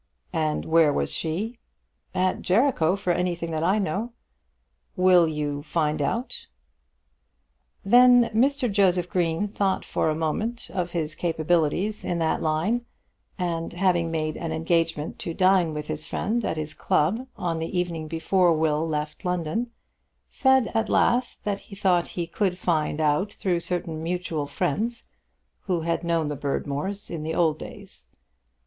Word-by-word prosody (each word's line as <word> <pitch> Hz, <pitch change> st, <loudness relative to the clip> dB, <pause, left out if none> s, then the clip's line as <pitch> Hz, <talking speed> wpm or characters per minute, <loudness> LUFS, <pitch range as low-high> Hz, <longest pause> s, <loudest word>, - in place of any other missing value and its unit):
"And 155 Hz, -2 st, 0 dB
where 160 Hz, -2 st, +4 dB
was -, -, 0 dB
she?" 205 Hz, +9 st, -3 dB, 0.6 s
"At 185 Hz, 0 st, +1 dB
Jericho, 190 Hz, -, +2 dB
for 195 Hz, -3 st, 0 dB
anything 175 Hz, -1 st, -2 dB
that 155 Hz, -1 st, -2 dB
I 190 Hz, +5 st, +3 dB
know." 205 Hz, +5 st, -2 dB, 0.8 s
"Will 180 Hz, -2 st, +5 dB
you 150 Hz, -2 st, -2 dB
find 155 Hz, -1 st, -1 dB
out?" 230 Hz, -, -3 dB, 1.4 s
Then 245 Hz, +2 st, +6 dB
Mr. 265 Hz, +3 st, +2 dB
Joseph 185 Hz, -3 st, +3 dB
Green 175 Hz, +2 st, 0 dB
thought 195 Hz, -2 st, -1 dB
for -, -, 0 dB
a 155 Hz, -, 0 dB
moment 215 Hz, +10 st, -2 dB
of 180 Hz, -2 st, -2 dB
his 160 Hz, -3 st, -2 dB
capabilities 170 Hz, +5 st, 0 dB
in 175 Hz, -, -1 dB
that 165 Hz, -1 st, 0 dB
line, 170 Hz, +10 st, 0 dB, 0.5 s
and 170 Hz, -3 st, -2 dB
having 175 Hz, -2 st, +1 dB
made 155 Hz, -1 st, -2 dB
an 165 Hz, -, -4 dB
engagement 165 Hz, -1 st, 0 dB
to 165 Hz, -, -4 dB
dine 185 Hz, -3 st, +4 dB
with 150 Hz, -1 st, -4 dB
his 155 Hz, +2 st, -4 dB
friend 235 Hz, +2 st, -1 dB
at 160 Hz, -, -2 dB
his 155 Hz, 0 st, -4 dB
club 220 Hz, -, 0 dB
on 170 Hz, -2 st, -2 dB
the 165 Hz, +3 st, -2 dB
evening 165 Hz, -3 st, -3 dB
before 170 Hz, +2 st, +2 dB
Will 155 Hz, 0 st, +1 dB
left 150 Hz, +1 st, -3 dB
London, 180 Hz, +6 st, -1 dB, 0.6 s
said 265 Hz, -3 st, +3 dB
at 225 Hz, -1 st, 0 dB
last 245 Hz, +1 st, +2 dB
that 200 Hz, -1 st, -1 dB
he 200 Hz, -, -12 dB
thought 185 Hz, -3 st, +2 dB
he 170 Hz, -, 0 dB
could 180 Hz, +2 st, -1 dB
find 155 Hz, -4 st, 0 dB
out 155 Hz, +6 st, +1 dB
through 180 Hz, -4 st, -1 dB
certain 170 Hz, -2 st, -3 dB
mutual 165 Hz, -3 st, -2 dB
friends 220 Hz, +11 st, -2 dB, 0.6 s
who 180 Hz, -4 st, 0 dB
had 170 Hz, +1 st, -1 dB
known 170 Hz, -2 st, +1 dB
the 150 Hz, 0 st, -2 dB
Berdmores 145 Hz, +7 st, -3 dB
in 165 Hz, -3 st, -4 dB
the 160 Hz, +1 st, -3 dB
old 160 Hz, -3 st, +2 dB
days. -, -, -10 dB
170 Hz, 150 wpm, -25 LUFS, 160-195 Hz, 1.4 s, Then